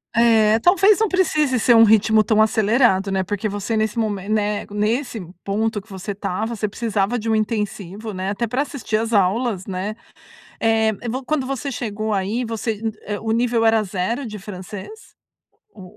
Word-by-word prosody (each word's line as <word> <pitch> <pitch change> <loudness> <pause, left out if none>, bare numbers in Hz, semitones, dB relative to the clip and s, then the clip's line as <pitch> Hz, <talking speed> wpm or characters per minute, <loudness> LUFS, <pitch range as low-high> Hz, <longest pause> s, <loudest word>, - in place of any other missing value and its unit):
É, 225 -2 +4
talvez 390 - +4
não 445 - +3
precise 305 -8 +1
ser 240 +1 +4
um 225 - +8
ritmo 220 0 +5
tão 215 +1 +2
acelerado, 215 -2 +3
né, 190 -1 0
porque 205 +2 -3
você 205 +3 -3
nesse 220 +1 -1
momen 210 -3 -2
né, 210 -1 0
nesse 225 +4 -1 0.2
ponto 210 +1 -1
que 215 - -25
você 195 +1 -6
estava, 205 +3 -3
você 210 0 -2
precisava 220 +1 -1
de 225 - -5
um - - +3
intensivo, 210 -1 -3
né, 190 +1 -3
até 205 +4 -1
pra 245 +5 -1
assistir 275 -7 -2
as 225 +1 -2
aulas, 205 0 +1
né? 195 +2 -4 0.7
Eh, 220 -1 +2 0.2
vo 255 +3 -3
quando 305 -1 -1
você 275 +1 -4
chegou 220 -3 -3
aí, 205 +6 -1
você 225 -1 -3
hum 220 - 0
é 205 -1 -4
o 220 0 -2
nível 235 0 +1
era 225 -1 +4
0 205 +7 -2
de 215 -2 -7
francês 205 - -10 0.6
ou 195 - -12
220 Hz, 180 wpm, -21 LUFS, 205-235 Hz, 0.7 s, um